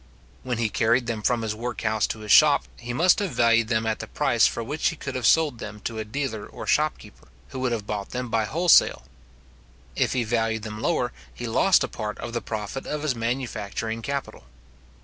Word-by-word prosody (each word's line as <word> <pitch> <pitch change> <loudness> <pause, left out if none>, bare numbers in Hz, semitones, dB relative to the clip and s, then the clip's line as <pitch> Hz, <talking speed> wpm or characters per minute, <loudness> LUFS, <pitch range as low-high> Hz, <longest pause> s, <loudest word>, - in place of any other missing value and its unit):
When 125 -2 -3
he 115 -1 +1
carried 115 +3 +2
them 115 -2 -3
from 120 +1 +1
his 110 -1 -1
workhouse 110 -1 -1
to 110 - -5
his 105 - -3
shop, 150 -2 +7 0.2
he 120 0 -6
must 170 +9 +4
have 195 -8 -2
valued 115 -1 +4
them 110 -1 0
at 110 -1 -1
the - - -6
price - - +3
for 115 - -3
which 145 +6 0
he - - -6
could 140 -3 -6
have 130 -3 0
sold 150 -7 +3
them 105 -2 -7
to 115 -1 -4
a - - -2
dealer 110 -1 -4
or - - -9
shopkeeper, - - -1 0.2
who - - -6
would 130 -1 0
have 110 -3 -2
bought 105 -1 -4
them 125 0 -4
by 115 -1 0
wholesale. 170 +8 +4 0.9
If - - +1
he 125 -2 +1
valued 115 -1 -1
them 110 -1 -6
lower, - - 0 0.2
he 90 - -7
lost 170 +11 +3
a - - -1
part 105 -1 -5
of 120 - -6
the 120 - -2
profit 110 +5 -5
of 150 0 -3
his 150 -4 +1
manufacturing 115 -2 -3
capital. 140 +3 -5
115 Hz, 210 wpm, -25 LUFS, 110-130 Hz, 0.9 s, shop